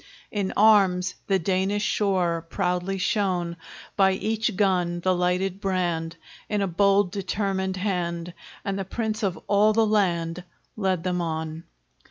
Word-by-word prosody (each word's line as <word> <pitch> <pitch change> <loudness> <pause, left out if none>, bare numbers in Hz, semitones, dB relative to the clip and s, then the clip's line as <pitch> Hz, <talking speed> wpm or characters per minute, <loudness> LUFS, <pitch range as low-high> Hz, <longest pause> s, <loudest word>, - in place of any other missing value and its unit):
In 200 -3 -1
arms 195 -4 +4
the 195 - +3
Danish 190 +3 0
shore 175 -6 0
Proudly 180 +1 -1
shone; 185 -4 0 0.4
By 190 -1 +4
each 215 +1 -1
gun 180 -3 +1
the 185 +1 +2
lighted 180 +2 0
brand, 175 -4 -1 0.3
In 205 -1 0
a - - 0
bold 200 +1 +3
determined 190 -1 -2
hand, 175 -3 -2 0.3
And 195 0 -2
the - - -1
Prince 220 +2 -3
of 195 -4 -1
all 210 +1 +4
the 225 +1 +3
land 180 -5 0 0.3
Led 190 -5 0
them 180 -1 -1
on! 160 0 -4
190 Hz, 140 wpm, -25 LUFS, 175-200 Hz, 0.4 s, arms